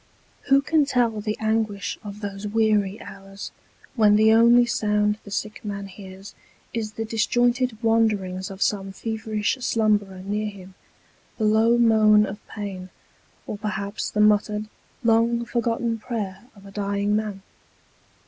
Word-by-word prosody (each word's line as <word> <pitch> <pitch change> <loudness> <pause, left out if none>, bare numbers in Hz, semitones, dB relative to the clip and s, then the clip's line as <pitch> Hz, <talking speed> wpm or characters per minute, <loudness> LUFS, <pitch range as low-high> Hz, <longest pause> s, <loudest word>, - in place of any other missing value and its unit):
Who 275 +1 +5
can 305 -1 +2
tell 235 -5 +1
the 215 0 -3
anguish 220 -2 -1
of 205 0 -8
those 200 0 -5
weary 210 -1 +1
hours, 195 0 -9 0.4
when 210 -3 +5
the 220 +1 +5
only 235 +2 +6
sound 210 -2 0
the - - -11
sick 215 +1 -4
man 200 -1 -5
hears, 195 0 -11 0.4
is 215 -2 -3
the 225 - -4
disjointed 240 +2 +1
wanderings 205 -5 +1
of 195 0 -2
some 195 -2 -1
feverish 220 +2 -2
slumberer 205 -5 0
near 210 +2 -2
him, 190 -2 -12 0.6
the 220 - -2
low 220 +2 +4
moan 215 -2 +5
of 205 +1 -8
pain, 190 -3 -6 0.6
or 205 - -6
perhaps 205 -1 -3
the 210 - 0
muttered, 210 0 +2 0.3
long 235 +1 +2
forgotten 235 -1 -1
prayer 210 -3 -5
of 200 - -17
the 200 - -12
dying 200 0 -1
man 210 -3 -3
210 Hz, 140 wpm, -24 LUFS, 200-225 Hz, 0.6 s, only